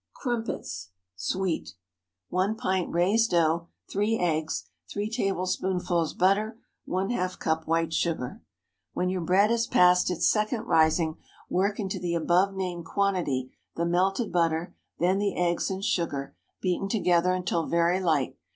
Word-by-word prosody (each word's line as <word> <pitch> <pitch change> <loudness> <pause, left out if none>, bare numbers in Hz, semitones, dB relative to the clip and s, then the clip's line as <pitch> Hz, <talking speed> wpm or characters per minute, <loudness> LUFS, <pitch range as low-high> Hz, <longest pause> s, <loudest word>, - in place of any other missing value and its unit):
CRUMPETS 230 - -4 0.3
(Sweet.) 170 - -2 0.5
1 190 +4 +1
pint 190 -6 -1
raised 200 +7 +3
dough. 170 0 +2 0.2
3 210 +3 +1
eggs. 160 -4 -1 0.3
3 205 +1 -2
tablespoonfuls 185 -5 -1
butter. 210 +4 +2 0.3
½ 185 -1 -1
cup 160 0 -1
white 165 0 +1
sugar. 160 -9 -1 0.5
When 180 - 0
your 185 -1 -1
bread 190 +6 +3
has 235 0 +1
passed 180 0 +5
its 180 - +1
second 215 +1 +1
rising, 160 -4 +2 0.3
work 200 +3 +1
into 195 -3 -2
the 175 -1 -1
above 180 +4 +2
named 180 -3 -3
quantity 165 -9 0 0.2
the 170 - 0
melted 190 +6 +1
butter, 165 -1 0 0.2
then 185 +3 +2
the 200 -1 0
eggs 175 +1 +1
and 190 +1 -3
sugar, 145 -6 -1 0.3
beaten 185 +1 0
together 180 -3 +2
until 175 -3 -1
very 170 +2 +2
light. 160 -8 0
180 Hz, 135 wpm, -27 LUFS, 170-195 Hz, 0.5 s, passed